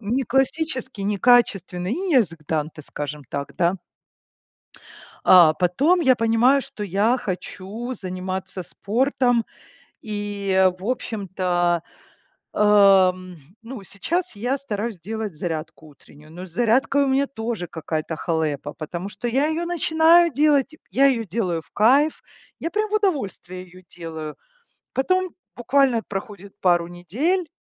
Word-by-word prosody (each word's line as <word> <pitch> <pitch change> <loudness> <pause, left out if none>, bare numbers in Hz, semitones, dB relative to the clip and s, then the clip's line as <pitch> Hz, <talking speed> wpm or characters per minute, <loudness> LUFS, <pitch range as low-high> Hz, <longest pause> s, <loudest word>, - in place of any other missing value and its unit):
...неклассический, 260 +1 -1
некачественный, 200 -4 +2
не 365 +3 -2
язык 190 - +2
Данте, 155 0 -3
скажем 145 0 -6
так, 140 0 -5
да. 175 +1 +2 1.5
А, 170 -4 +7
потом 220 - +2
я 265 -6 +4
понимаю, 235 +4 +3
что 270 -6 -8
я 205 +6 +1
хочу 205 +5 -5
заниматься 185 0 -5
спортом 245 +3 0 0.6
и, 200 -3 0
в 190 - -11
общем-то, 185 -7 -1 0.7
ам, 190 -3 +4 0.3
ну, 235 -2 -8
сейчас 315 - -3
я 245 +6 -1
стараюсь 220 -6 -4
делать 215 0 -5
зарядку 155 -1 -5
утреннюю, 150 +1 -18
но 180 +3 -8
с - - -15
зарядкой 245 +7 +2
у - - 0
меня 270 +1 +2
тоже 225 -7 -4
какая-то 160 -1 -4
халепа, 155 -4 -2
потому 175 +4 -6
что 210 +4 -5
я 265 +5 +1
ее 315 +2 -1
начинаю 335 0 +4
делать, 290 +1 +2 0.2
я 275 +1 +4
ее 245 -4 +1
делаю 175 -4 -2
в - - -27
кайф. 275 +8 +3 0.4
Я 330 - -4
прям 425 +3 -1
в - - -3
удовольствие 205 - -2
ее 185 0 -17
делаю. 160 -3 -7 0.6
Потом 370 +7 +1 0.3
буквально 245 -1 +2
проходит 200 0 -7 0.4
недель, 270 - -1
210 Hz, 125 wpm, -22 LUFS, 180-265 Hz, 1.5 s, А